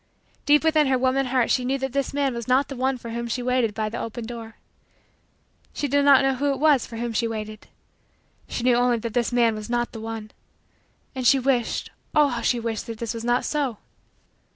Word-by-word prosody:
Deep 295 0 +5
within 310 -2 +3
her 265 -1 +2
woman 260 +1 +1
heart 250 -2 +1
she 255 - +2
knew 265 +2 0
that 265 -1 -4
this 275 -1 -1
man 275 -2 0
was 235 0 -6
not 260 +2 +2
the 275 - -5
one 260 +1 0
for 235 -1 -8
whom 235 +1 -4
she 245 +2 -3
waited 250 -4 +1
by 215 -1 -1
the 215 - -5
open 230 0 -5
door. 230 -1 -8 1.2
She 290 - -2
did 285 +1 +2
not 275 -1 +6
know 270 0 +2
who 280 +2 0
it - - -6
was 295 -4 +3
for 230 - -8
whom 235 0 -3
she 230 +2 0
waited. 215 -1 -6 0.8
She 235 - -4
knew 250 -1 +4
only 245 -1 +3
that 225 -1 -5
this 240 0 0
man 235 -2 +3
was 215 +1 -7
not 240 0 -1
the 225 - -8
one. 225 -1 -6 0.8
And 255 -3 0
she 275 - +6
wished 255 -3 0 0.2
oh, 300 -1 +5
how 240 -2 -3
she 240 +1 +1
wished 230 0 -4
that 230 -1 -6
this 230 +1 -4
was 230 -1 -6
not 240 +1 +1
so. 280 -7 -1
245 Hz, 225 wpm, -24 LUFS, 230-270 Hz, 1.2 s, not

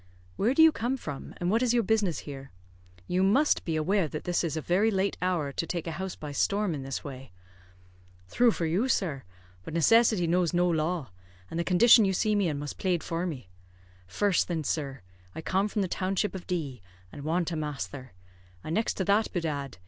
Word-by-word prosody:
"Where 230 +7 +1
do 320 - +7
you 320 - +8
come 255 -1 -2
from, 145 - -7
and 175 +1 -1
what 225 +2 +2
is 245 -1 +2
your 235 - +3
business 205 -6 0
here? 135 -2 -8 0.6
You 180 - 0
must 240 +11 +3
be 165 - -2
aware 180 +3 +1
that 150 +1 -6
this 175 0 0
is 160 -2 -2
a - - 0
very 185 +8 +2
late 195 -1 0
hour 175 -6 0
to 165 - -3
take 170 -3 -3
a 165 - -3
house 190 +2 -5
by 150 -1 -7
storm 200 +5 0
in 145 - -4
this 135 0 -5
way." 135 -5 -9 1.0
"Thrue 240 - +3
for 175 -6 -1
you, 180 +10 +1
sir. 170 - 0 0.4
But 155 - -7
necessity 215 +2 +4
knows 175 0 +1
no 175 +1 +3
law; 160 - -1 0.4
and 165 - -3
the - - +1
condition 220 +6 +6
you 190 -1 +1
see 215 +3 +1
me 205 -3 +2
in 150 -3 -2
must 145 0 -6
plade 180 -3 0
for 170 +2 -2
me. 125 - -7 0.6
First, 200 - +1
thin, 165 -3 -2
sir, 140 -4 -3 0.3
I - - -5
come 190 +5 0
from 210 -1 -1
the - - -1
township 190 +3 -1
of 190 -2 -8
D, 145 - -3 0.3
and 140 - -9
want 170 +3 0
a - - -2
masther; 145 -4 -5 0.5
and 155 - -4
next 220 +4 0
to 190 - -2
that, 205 +3 +2
bedad! 145 - -3
175 Hz, 210 wpm, -28 LUFS, 155-200 Hz, 1.0 s, you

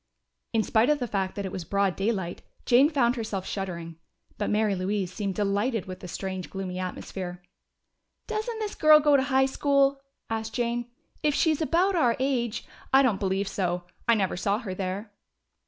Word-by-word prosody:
In 225 -2 +2
spite 225 +5 +3
of 300 - +4
the 250 -3 -3
fact 195 -3 -2
that 200 - -3
it 190 - -4
was 185 - -4
broad 200 +1 +1
daylight, 195 -4 -2 0.2
Jane 260 +4 +6
found 255 -6 +2
herself 215 -5 -3
shuddering. 170 -4 -5 0.4
But 210 - 0
Mary 210 -1 +2
Louise 190 0 -2
seemed 200 -3 -3
delighted 205 +2 0
with 185 -1 -7
the 180 - -8
strange, 185 +1 -5
gloomy 185 -1 -4
atmosphere. 180 -1 -5 0.8
"Doesn't 445 +1 -3
this 430 -2 -3
girl 310 0 +7
go 295 -1 +4
to 275 - +5
high 265 0 +3
school?" 275 0 +2 0.3
asked 225 -1 -3
Jane. 240 0 -1 0.3
"If 295 -2 +2
she's 320 -2 +2
about 355 +5 +2
our 245 -8 +3
age 245 -4 -1
" - - -23
"I 270 +1 +6
don't 225 -7 +2
believe 195 0 0
so. 180 -3 -1 0.2
I 235 - +6
never 195 -4 0
saw 200 +3 0
her 210 -5 -5
there." 195 +3 -4
215 Hz, 185 wpm, -27 LUFS, 190-265 Hz, 0.8 s, girl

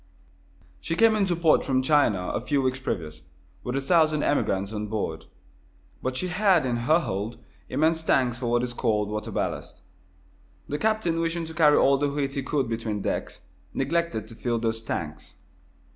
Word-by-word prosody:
She 165 - -3
came 225 +2 +5
into 195 -4 +1
port 165 -2 +3
from 130 -1 +1
China, 130 -11 +2
a - - -2
few 140 -2 0
weeks 130 0 0
previous, 80 -11 -4 0.4
with 125 - -3
a 135 - 0
thousand 155 0 +3
emigrants 100 -7 0
on 105 0 -3
board. 110 0 -3 0.8
But 130 0 -2
she 185 - -2
had 185 -3 +3
in 125 -2 0
her 155 +8 +3
hold 105 - -3 0.3
immense 160 +2 +1
tanks 125 -6 +1
for 125 - -3
what 120 +1 +2
is 125 -1 -3
called 105 -4 0
water 105 +1 -4
ballast. - - -4 0.8
The 145 - -3
captain, 215 -7 +1
wishing 165 0 -1
to 160 - -8
carry 155 -2 +5
all 140 0 +4
the 145 0 +1
wheat 140 -1 -2
he 140 - -2
could 135 -1 -1
between 110 -3 -3
decks, - - -3 0.3
neglected 170 -9 -1
to - - -10
fill 120 +1 -1
those 115 -1 -2
tanks. 75 -10 -5
135 Hz, 175 wpm, -26 LUFS, 115-160 Hz, 0.8 s, came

